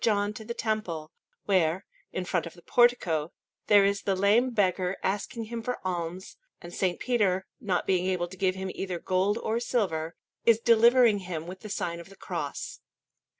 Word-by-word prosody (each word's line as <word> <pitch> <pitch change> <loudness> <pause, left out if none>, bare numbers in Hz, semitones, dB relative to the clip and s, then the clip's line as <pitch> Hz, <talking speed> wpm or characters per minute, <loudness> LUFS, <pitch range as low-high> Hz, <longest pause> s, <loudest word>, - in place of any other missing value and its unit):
John 205 -2 +2
to 220 - -8
the 235 +2 -5
Temple, 180 -8 -2 0.3
where, 185 -2 +2 0.3
in 185 - -3
front 175 -2 -1
of 170 - -11
the 175 - -17
portico, 180 -10 +2 0.4
there 205 -2 +6
is 200 +1 +1
the 195 - 0
lame 210 +7 +3
beggar 185 -4 +1
asking 205 +4 -2
him 230 +1 -5
for 250 +2 -3
alms, 180 0 -4 0.2
and 175 0 -10
S. 185 -2 0
Peter, 195 -7 +1
not 195 -8 -1
being 185 -1 +1
able 180 -2 0
to 185 - -11
give 185 0 +1
him 190 0 -4
either 185 -2 -3
gold 190 +4 +1
or 230 0 -1
silver, 175 -10 -1 0.3
is 230 -2 +5
delivering 235 -1 +5
him 175 -4 -5
with 185 +2 -8
the 215 - -9
sign 170 -4 -3
of 170 - -11
the 195 - -14
Cross. - - -5
190 Hz, 185 wpm, -28 LUFS, 180-220 Hz, 0.4 s, there